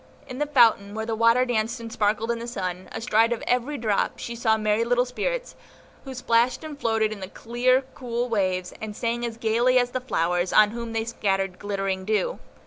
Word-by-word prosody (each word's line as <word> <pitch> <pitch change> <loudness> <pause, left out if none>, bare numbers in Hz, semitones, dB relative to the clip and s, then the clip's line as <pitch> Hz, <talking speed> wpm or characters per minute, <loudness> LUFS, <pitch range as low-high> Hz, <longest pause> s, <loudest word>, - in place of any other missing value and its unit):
In 255 -1 -8
the 295 - 0
fountain, 225 -7 +4
where 220 0 -3
the 225 - -2
water 230 +3 +4
danced 230 0 -1
and 230 0 -8
sparkled 215 +2 +1
in 235 - -2
the 235 - -6
sun, 185 -5 -4
astride 225 0 +2
of 235 - -2
every 250 +4 0
drop 215 -4 0
she 235 - -6
saw 220 -1 +2
merry 215 +1 +1
little 245 +1 +2
spirits, - - -3 0.5
who 265 -1 -7
plashed 240 +3 +1
and 300 -2 -8
floated 225 -3 +1
in 215 - -6
the 190 - -6
clear, 250 +4 +1
cool 245 -1 -3
waves, 185 -5 -1
and 215 -1 -5
sang 235 +1 -2
as 230 -1 -4
gayly 235 +3 +2
as 245 -1 +2
the 255 - -2
flowers, 175 -6 0
on 210 -1 +5
whom 235 0 -5
they 225 0 -1
scattered 195 -5 -1
glittering 195 -2 -2
dew. 220 - -1
230 Hz, 205 wpm, -25 LUFS, 210-245 Hz, 0.5 s, on